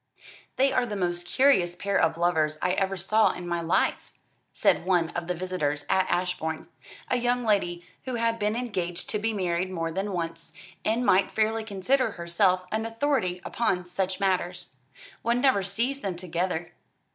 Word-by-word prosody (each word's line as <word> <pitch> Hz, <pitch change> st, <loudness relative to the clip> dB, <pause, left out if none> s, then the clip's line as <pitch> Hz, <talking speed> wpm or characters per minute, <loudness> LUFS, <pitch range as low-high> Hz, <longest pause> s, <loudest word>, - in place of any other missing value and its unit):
"They 270 Hz, +1 st, +3 dB
are 250 Hz, -2 st, +2 dB
the 210 Hz, -, -4 dB
most 175 Hz, -2 st, -2 dB
curious 190 Hz, -11 st, +3 dB
pair 200 Hz, +2 st, -2 dB
of 165 Hz, 0 st, +3 dB
lovers 160 Hz, -3 st, +1 dB
I 180 Hz, -, +1 dB
ever 195 Hz, +1 st, 0 dB
saw 215 Hz, +5 st, +3 dB
in 180 Hz, -, -7 dB
my 170 Hz, -1 st, -1 dB
life," 165 Hz, +2 st, +1 dB, 0.4 s
said -, -, +2 dB
one 175 Hz, -3 st, +2 dB
of 170 Hz, -1 st, -4 dB
the 180 Hz, -, -1 dB
visitors 160 Hz, -5 st, -2 dB
at 190 Hz, -, +2 dB
Ashbourne, 175 Hz, -3 st, -1 dB, 0.4 s
a 255 Hz, -, +3 dB
young 245 Hz, 0 st, 0 dB
lady 175 Hz, -5 st, +1 dB, 0.2 s
who 255 Hz, -2 st, -3 dB
had 230 Hz, -1 st, 0 dB
been 210 Hz, +1 st, 0 dB
engaged 185 Hz, -8 st, -3 dB
to 210 Hz, -, 0 dB
be 225 Hz, +2 st, 0 dB
married 185 Hz, -3 st, -1 dB
more 165 Hz, -3 st, -2 dB
than 195 Hz, +4 st, -2 dB
once, 165 Hz, -2 st, -4 dB, 0.3 s
and 230 Hz, +3 st, +1 dB
might 190 Hz, -2 st, +4 dB
fairly 220 Hz, +1 st, 0 dB
consider 220 Hz, +4 st, +1 dB
herself 180 Hz, +2 st, +1 dB
an 220 Hz, +1 st, -1 dB
authority 225 Hz, -7 st, 0 dB
upon 185 Hz, -6 st, 0 dB
such 185 Hz, +1 st, -2 dB
matters. 180 Hz, -6 st, -1 dB, 0.4 s
"One 235 Hz, +1 st, +1 dB
never 255 Hz, -6 st, +4 dB
sees 230 Hz, +9 st, -1 dB
them 195 Hz, -6 st, -2 dB
together." 175 Hz, -1 st, -2 dB
185 Hz, 170 wpm, -27 LUFS, 175-220 Hz, 0.4 s, might